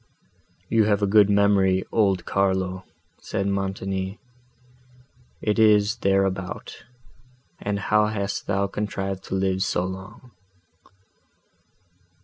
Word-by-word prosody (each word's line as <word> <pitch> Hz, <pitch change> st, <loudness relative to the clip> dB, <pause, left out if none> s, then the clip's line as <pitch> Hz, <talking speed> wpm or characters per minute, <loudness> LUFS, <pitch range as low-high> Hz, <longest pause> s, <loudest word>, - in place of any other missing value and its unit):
"You 110 Hz, -2 st, +3 dB
have 105 Hz, -1 st, +1 dB
a -, -, +5 dB
good 105 Hz, 0 st, +5 dB
memory, 100 Hz, -2 st, +3 dB
old 95 Hz, -5 st, +1 dB
Carlo," 95 Hz, -1 st, 0 dB, 0.3 s
said 100 Hz, -, -3 dB
Montoni: 95 Hz, 0 st, -2 dB, 1.3 s
"it 105 Hz, +1 st, 0 dB
is 105 Hz, 0 st, +4 dB
thereabout; 95 Hz, -3 st, -1 dB, 0.7 s
and 100 Hz, 0 st, -2 dB
how 105 Hz, +1 st, +2 dB
hast 100 Hz, -2 st, -3 dB
thou 100 Hz, 0 st, +1 dB
contrived 95 Hz, -1 st, -4 dB
to -, -, -3 dB
live 95 Hz, 0 st, 0 dB
so 90 Hz, -1 st, 0 dB
long?" 95 Hz, +7 st, -9 dB
100 Hz, 105 wpm, -24 LUFS, 95-105 Hz, 1.3 s, a